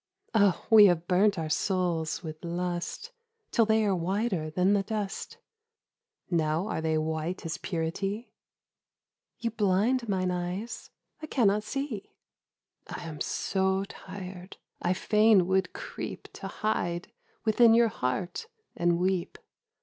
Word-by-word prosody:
' - - -52
Oh 205 -5 +3
we 215 -2 +10
have 175 -2 +1
burnt 200 +2 +3
our 160 -1 -2
souls 170 0 0
with 155 -1 -7
lust 175 - -3 0.4
Till 230 -3 +3
they 220 0 +3
are 195 -2 +2
whiter 185 -1 -1
than 180 +5 +2
the 200 - +3
dust... 205 -1 -4 0.9
Now 160 +2 +1
are 160 - -2
they 160 -1 +1
white 160 +3 -2
as 165 0 -3
purity? 195 +6 -3 0.3
' - - -64
' - - -63
You 230 -1 -1
blind 220 +4 +1
mine 185 -2 +1
eyes... 180 +6 -4 0.3
I 310 - -6
cannot 210 -8 +3
see.' 250 -1 -5 0.4
' - - -58
I - - -6
am 155 -2 -7
so 190 0 0
tired 185 -1 -9
— - - -44
I 175 - +2
fain 210 0 +4
would 190 +1 +1
creep - - -7
To - - -7
hide 175 -5 -2 0.3
within 225 +1 +6
your 235 -1 +5
heart 175 - -3 0.3
and 175 0 +2
weep.' 185 0 -1
190 Hz, 145 wpm, -29 LUFS, 175-215 Hz, 0.9 s, we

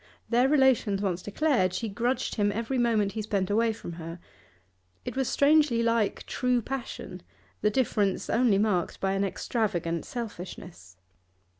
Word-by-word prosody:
Their 245 +3 +4
relations 265 -8 +3
once 190 -3 -1
declared, 205 - +1
she 230 - -2
grudged 240 +5 -1
him 205 -2 +1
every 230 +5 -2
moment 220 -4 +2
he 220 - -4
spent 200 -2 -1
away 225 +2 +3
from 205 - -7
her. 165 +1 -7 0.9
It - - -5
was 265 -2 0
strangely 285 -5 +4
like 230 -3 0
true 250 -1 +1
passion, 255 +2 -6 0.4
the 210 - +3
difference 210 -4 0
only 230 -4 +3
marked 200 -4 0
by 195 - 0
an 195 +1 0
extravagant 180 -5 -2
selfishness. 180 - -8
220 Hz, 145 wpm, -28 LUFS, 195-245 Hz, 0.9 s, Their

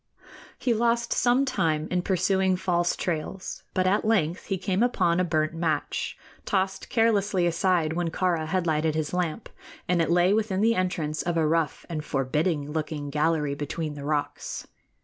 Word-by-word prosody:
He 245 - +1
lost 235 +1 +1
some 250 +3 +3
time 160 - 0
in 180 -1 +1
pursuing 190 0 +2
false 175 -1 +1
trails; 175 +2 -4
but 185 - +2
at 195 +3 +2
length 190 -6 +1
he 195 - -1
came 190 +2 -1
upon 180 -8 +2
a - - +3
burnt 155 -2 0
match, 165 -1 -2 0.3
tossed 190 -1 -1
carelessly 210 -5 +2
aside 170 -2 +1
when 175 0 -1
Kāra 170 -2 0
had 180 +1 0
lighted 155 -1 +1
his 155 0 -2
lamp, 180 +3 -2 0.4
and 180 -2 +2
it 165 - 0
lay 175 +3 +4
within 210 -3 0
the 225 +2 +4
entrance 165 -6 -1
of 170 -1 -1
a 160 - +3
rough 160 0 0
and 155 -3 -4
forbidding 145 +3 -1
looking 150 -2 -3
gallery 150 -1 +1
between 150 +2 -4
the 145 -1 -8
rocks. 145 0 -3
175 Hz, 170 wpm, -26 LUFS, 155-190 Hz, 0.4 s, lay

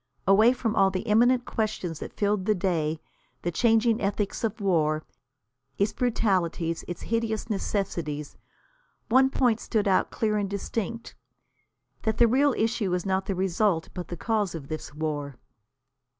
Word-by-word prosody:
Away 215 +5 +6
from 235 -3 -2
all 195 0 +5
the 185 -1 -2
imminent 240 +3 +3
questions 200 -7 -3
that - - -8
filled 205 -2 +1
the 215 0 +3
day, 165 -4 -1 0.4
the 175 - -1
changing 225 +3 +3
ethics 200 +1 -2
of 225 0 -1
war, 155 -6 +1 0.7
its 205 +2 +1
brutalities, 185 -8 0
its 175 -1 -6
hideous 230 -1 -2
necessities, 170 -7 -3 0.7
one 260 +3 +5
point 245 -4 +2
stood 215 -3 -1
out 190 - +3
clear 215 -1 0
and 200 -2 -1
distinct. 225 +3 -4 0.9
That 220 - -1
the 235 - +6
real 270 +4 +3
issue 220 -3 0
is 180 - -3
not 190 0 0
the 195 - -1
result, 185 -2 +1
but 180 - -6
the 175 - -6
cause 210 -3 -1
of 140 -4 -8
this 155 - -5
war. 145 -3 -4
200 Hz, 150 wpm, -27 LUFS, 175-225 Hz, 0.9 s, Away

